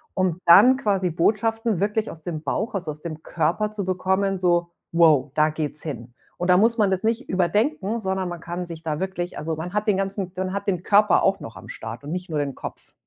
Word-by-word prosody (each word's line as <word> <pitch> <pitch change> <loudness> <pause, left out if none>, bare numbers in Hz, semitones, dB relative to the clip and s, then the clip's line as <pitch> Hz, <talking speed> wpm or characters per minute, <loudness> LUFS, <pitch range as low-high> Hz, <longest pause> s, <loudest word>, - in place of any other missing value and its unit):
um 185 -2 0
dann 215 +10 +8
quasi 195 -7 0
Botschaften 225 +3 +1
wirklich 210 +2 0
aus 160 -2 -11
dem 160 -3 -4
Bauch, 210 +10 -2
also 180 -5 -3
aus 150 - -10
dem 160 -2 -6
Körper 175 +6 0
zu 205 -3 -3
bekommen, 190 +1 0
so: 175 -1 +2 0.2
„Wow, 155 -5 +5
da 155 0 +4
geht's 150 -1 -3
hin.“ 120 -6 -7 0.2
Und 180 +1 -2
dann 180 +1 +6
muss 230 +2 +3
man 205 -3 +3
das 190 +2 -1
nicht 230 +3 -1
überdenken, 210 - 0
sondern 190 -2 -2
man 175 - -6
kann 175 +1 -5
sich 165 -1 -8
da 155 -2 -2
wirklich 185 -2 -4
also, 160 +1 -2
man 175 +4 -6
hat 210 +1 -1
den 200 -2 +3
ganzen 195 -1 -2
man 185 0 -2
hat 200 +1 -4
den 180 -3 0
Körper 205 -1 +4
auch 195 0 +2
noch 115 - -9
am - - -12
Start 115 +4 -7
und 145 - -6
nicht 180 -1 -4
nur 155 - -2
den 140 -2 -2
Kopf. - - -8
185 Hz, 230 wpm, -23 LUFS, 165-200 Hz, 0.2 s, dann